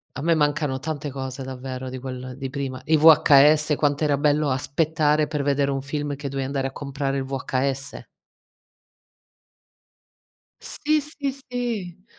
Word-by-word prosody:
A 140 Hz, -, -5 dB
me 170 Hz, -, +3 dB
mancano 145 Hz, -3 st, 0 dB
tante 145 Hz, 0 st, -4 dB
cose 130 Hz, 0 st, -5 dB
davvero 130 Hz, 0 st, -6 dB
di 130 Hz, 0 st, -6 dB
quel 130 Hz, -1 st, -7 dB
di 135 Hz, -1 st, -4 dB
prima. 135 Hz, -2 st, -4 dB
I 160 Hz, 0 st, +4 dB
VHS 150 Hz, -1 st, +6 dB
quant'era 145 Hz, -1 st, +1 dB
bello 150 Hz, 0 st, +2 dB
aspettare 150 Hz, +3 st, +1 dB
per 150 Hz, -1 st, -2 dB
vedere 140 Hz, 0 st, +1 dB
un 135 Hz, -1 st, -1 dB
film, 145 Hz, +1 st, -3 dB
che 140 Hz, +1 st, -6 dB
dovevi 135 Hz, -1 st, -3 dB
andare 135 Hz, -1 st, -1 dB
a -, -, -7 dB
comprare 140 Hz, -1 st, -3 dB
il 135 Hz, -, -1 dB
VHS. 135 Hz, +1 st, -3 dB, 2.6 s
Sì, 305 Hz, 0 st, 0 dB
sì, 290 Hz, -1 st, -4 dB, 0.2 s
sì. 215 Hz, -7 st, -4 dB
140 Hz, 145 wpm, -24 LUFS, 135-150 Hz, 2.6 s, VHS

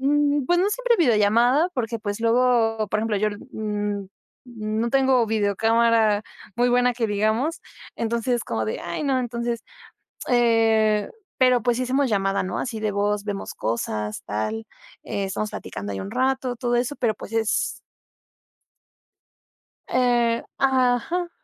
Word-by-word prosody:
mm, 290 Hz, 0 st, +2 dB
pues 350 Hz, +6 st, +2 dB
no 375 Hz, +3 st, +3 dB
siempre 480 Hz, +2 st, +1 dB
videollamada, 240 Hz, -, +3 dB
porque, 230 Hz, -2 st, -2 dB
pues, 205 Hz, 0 st, -4 dB
luego, 230 Hz, -2 st, +2 dB
por 215 Hz, -, +1 dB
ejemplo, 220 Hz, -1 st, 0 dB
yo, 215 Hz, +1 st, +1 dB, 0.2 s
mm 205 Hz, -2 st, -3 dB, 0.4 s
mm, 215 Hz, -2 st, -3 dB
no 235 Hz, -, 0 dB
tengo 265 Hz, -3 st, +3 dB
videocámara 220 Hz, 0 st, +2 dB, 0.3 s
muy 245 Hz, +1 st, +3 dB
buena 245 Hz, 0 st, +3 dB
que 230 Hz, -2 st, 0 dB
digamos, 220 Hz, +10 st, 0 dB, 0.4 s
entonces 235 Hz, +2 st, -1 dB
es, 235 Hz, -, -5 dB
como 110 Hz, -1 st, -2 dB
de, 110 Hz, -, -3 dB
ay, 170 Hz, -, -4 dB
no. 270 Hz, -2 st, +1 dB
Entonces, 235 Hz, -1 st, -3 dB, 0.6 s
eh, 225 Hz, -3 st, +3 dB, 0.3 s
pero, 255 Hz, -2 st, +4 dB
pues, 240 Hz, -1 st, +1 dB
sí -, -, 0 dB
hacemos 265 Hz, +2 st, +1 dB
llamada, 195 Hz, -1 st, +1 dB
¿no?, 185 Hz, -1 st, -3 dB
así 240 Hz, -4 st, -4 dB
de 215 Hz, -2 st, -1 dB
voz, 205 Hz, 0 st, 0 dB
vemos 200 Hz, -1 st, -5 dB
cosas, 105 Hz, -2 st, -3 dB
tal, 110 Hz, -, -3 dB, 0.4 s
eh, 200 Hz, -, -3 dB
estamos 210 Hz, +2 st, -3 dB
platicando 100 Hz, 0 st, -6 dB
ahí 95 Hz, -, -4 dB
un 95 Hz, +1 st, -6 dB
rato, 260 Hz, -1 st, 0 dB
todo 240 Hz, 0 st, 0 dB
eso, 245 Hz, +4 st, 0 dB
pero 230 Hz, -3 st, 0 dB
pues 205 Hz, -, -10 dB
es 225 Hz, -2 st, 0 dB, 2.1 s
Eh 240 Hz, -2 st, +2 dB
Ajá. 265 Hz, +6 st, +1 dB
230 Hz, 150 wpm, -23 LUFS, 210-250 Hz, 2.1 s, pero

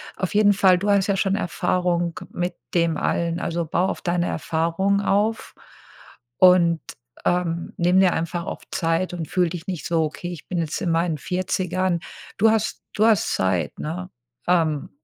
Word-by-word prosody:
auf 190 Hz, +2 st, -3 dB
jeden 205 Hz, -1 st, +5 dB
Fall 190 Hz, -2 st, +5 dB
du 205 Hz, +3 st, 0 dB
hast 200 Hz, -1 st, +3 dB
ja 195 Hz, -1 st, +1 dB
schon 195 Hz, 0 st, +1 dB
Erfahrung 175 Hz, -2 st, -1 dB
mit 175 Hz, +1 st, -3 dB, 0.2 s
dem 170 Hz, -2 st, +2 dB
allen. 170 Hz, 0 st, -1 dB
Also, 170 Hz, -1 st, -2 dB
baue 175 Hz, +4 st, 0 dB
auf -, -, -4 dB
deine 175 Hz, -1 st, 0 dB
Erfahrungen 170 Hz, +6 st, 0 dB
auf, 205 Hz, +3 st, 0 dB, 0.8 s
und, 175 Hz, -3 st, +5 dB, 0.4 s
ähm, 170 Hz, -1 st, -1 dB
nimm 180 Hz, +2 st, +3 dB
dir 185 Hz, -2 st, +4 dB
einfach 170 Hz, +1 st, -3 dB
auf -, -, -6 dB
Zeit 165 Hz, +2 st, 0 dB
und 165 Hz, -3 st, -4 dB
fühl 180 Hz, 0 st, +1 dB
dich 170 Hz, -1 st, -7 dB
nicht 180 Hz, -4 st, -4 dB
so: 165 Hz, -2 st, +1 dB
„Okay, 175 Hz, +3 st, -5 dB
ich 165 Hz, -, -9 dB
bin 180 Hz, -2 st, -2 dB
jetzt 160 Hz, -1 st, -2 dB
in 175 Hz, -4 st, 0 dB
meinen 165 Hz, -1 st, +1 dB
40ern.“ 185 Hz, +2 st, -1 dB, 0.4 s
Du 220 Hz, +2 st, +5 dB
hast 220 Hz, -1 st, -1 dB
du 215 Hz, -, +2 dB
hast 220 Hz, -3 st, +3 dB
Zeit, 90 Hz, -5 st, 0 dB
ne? 180 Hz, +4 st, -5 dB, 0.4 s
Ähm 160 Hz, -5 st, +1 dB
175 Hz, 170 wpm, -23 LUFS, 165-185 Hz, 0.8 s, jeden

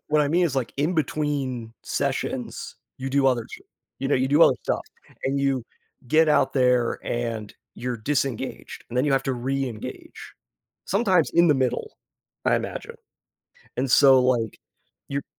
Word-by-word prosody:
what 150 Hz, 0 st, +3 dB
I 145 Hz, -, +2 dB
mean 175 Hz, +3 st, +3 dB
is, 140 Hz, -5 st, -1 dB
like, 130 Hz, -, -1 dB
in 155 Hz, +6 st, 0 dB
between 135 Hz, -6 st, -2 dB
sessions, -, -, -3 dB, 0.2 s
you 135 Hz, +1 st, -4 dB
do 140 Hz, 0 st, +3 dB
other 120 Hz, -3 st, +2 dB
sh -, -, -9 dB, 0.4 s
you 135 Hz, -, -1 dB
know, -, -, +3 dB
you 130 Hz, +1 st, +1 dB
do 150 Hz, +4 st, +5 dB
other -, -, +5 dB
stuff -, -, -1 dB, 0.4 s
and 140 Hz, +1 st, 0 dB
you 135 Hz, -3 st, 0 dB, 0.4 s
get 155 Hz, +4 st, +4 dB
out 140 Hz, -3 st, +3 dB
there 125 Hz, -3 st, +2 dB
and 115 Hz, -3 st, -3 dB, 0.2 s
you're 125 Hz, +1 st, -3 dB
disengaged, 130 Hz, +1 st, -3 dB
and 120 Hz, -, -6 dB
then 130 Hz, -, +3 dB
you 145 Hz, -, +2 dB
have 135 Hz, 0 st, +2 dB
to 135 Hz, -, 0 dB
re-engage, 130 Hz, -2 st, -5 dB, 0.5 s
sometimes 190 Hz, -5 st, +2 dB
in 170 Hz, 0 st, +6 dB
the 150 Hz, -, +5 dB
middle, 130 Hz, -, -1 dB, 0.5 s
I -, -, +3 dB
imagine, 470 Hz, -, -5 dB, 0.8 s
and 130 Hz, 0 st, 0 dB
so, 135 Hz, -1 st, +7 dB
like, 120 Hz, -4 st, 0 dB, 0.5 s
you're 140 Hz, 0 st, -2 dB
135 Hz, 165 wpm, -24 LUFS, 125-150 Hz, 0.8 s, so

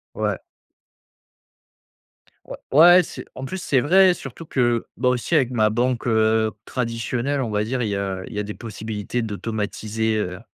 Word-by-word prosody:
Ouais. -, -, -1 dB, 2.1 s
Ouais, -, -, -8 dB, 0.2 s
ouais, 175 Hz, +5 st, +8 dB
c'est -, -, -9 dB
en 130 Hz, -, -8 dB
plus 135 Hz, +8 st, -4 dB
c'est 145 Hz, -7 st, +1 dB
vrai, 185 Hz, +7 st, +5 dB
surtout 150 Hz, 0 st, -9 dB
que, 120 Hz, -5 st, +1 dB
bah, 125 Hz, -, +2 dB
aussi 125 Hz, +6 st, -1 dB
avec 135 Hz, -6 st, +3 dB
ma 110 Hz, -4 st, +2 dB
banque, 120 Hz, +2 st, 0 dB
heu, 110 Hz, -1 st, +2 dB
traditionnelle, 125 Hz, +3 st, -2 dB
on 120 Hz, -, -2 dB
va 105 Hz, 0 st, 0 dB
dire, 125 Hz, +3 st, -2 dB
il 110 Hz, -, -1 dB
y 100 Hz, -, -1 dB
a 95 Hz, -1 st, -3 dB
il -, -, -10 dB
y -, -, -6 dB
a -, -, -1 dB
des 105 Hz, +1 st, -6 dB
possibilités 110 Hz, +1 st, -5 dB
d'automatiser, 110 Hz, 0 st, -2 dB
heu, 90 Hz, -4 st, -3 dB
115 Hz, 170 wpm, -22 LUFS, 110-130 Hz, 2.1 s, ouais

